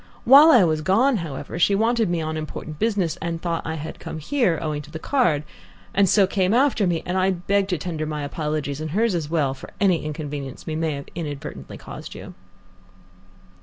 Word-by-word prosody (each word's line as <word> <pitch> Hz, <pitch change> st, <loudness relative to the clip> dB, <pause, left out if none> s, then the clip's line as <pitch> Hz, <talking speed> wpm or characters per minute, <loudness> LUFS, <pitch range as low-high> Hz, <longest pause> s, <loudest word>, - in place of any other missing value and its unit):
While 285 Hz, +5 st, +9 dB
I 245 Hz, -10 st, +7 dB
was 155 Hz, -3 st, +1 dB
gone, 225 Hz, -, +3 dB
however, 155 Hz, -2 st, -5 dB
she 200 Hz, +3 st, +4 dB
wanted 225 Hz, 0 st, +2 dB
me 170 Hz, -1 st, 0 dB
on 155 Hz, 0 st, -3 dB
important 155 Hz, 0 st, -6 dB
business, 195 Hz, -7 st, 0 dB
and 165 Hz, 0 st, -3 dB
thought 170 Hz, -1 st, -2 dB
I 160 Hz, -, -3 dB
had 160 Hz, 0 st, -7 dB
come -, -, -6 dB
here, 180 Hz, -, +1 dB
owing 155 Hz, -2 st, -3 dB
to 150 Hz, -, -14 dB
the 160 Hz, -, -6 dB
card, 160 Hz, -, +1 dB, 0.5 s
and 195 Hz, -2 st, +3 dB
so 200 Hz, +1 st, +5 dB
came 190 Hz, +2 st, +1 dB
after 250 Hz, -6 st, +3 dB
me, 170 Hz, -2 st, -1 dB
and 185 Hz, +1 st, -1 dB
I 185 Hz, +1 st, +3 dB
beg 195 Hz, +2 st, 0 dB
to 180 Hz, -3 st, -1 dB
tender 155 Hz, -1 st, -4 dB
my 150 Hz, -1 st, -3 dB
apologies, 150 Hz, -1 st, -3 dB
and 155 Hz, -, -4 dB
hers 215 Hz, +6 st, +1 dB
as 160 Hz, -4 st, -2 dB
well, 150 Hz, -5 st, +1 dB
for 135 Hz, -, -11 dB
any 185 Hz, -5 st, +2 dB
inconvenience 145 Hz, -3 st, -6 dB
we 155 Hz, -, -3 dB
may 160 Hz, -1 st, -1 dB
have 140 Hz, 0 st, -6 dB
inadvertently 145 Hz, -, -6 dB
caused -, -, -9 dB
you." -, -, -9 dB
165 Hz, 205 wpm, -23 LUFS, 155-195 Hz, 0.5 s, While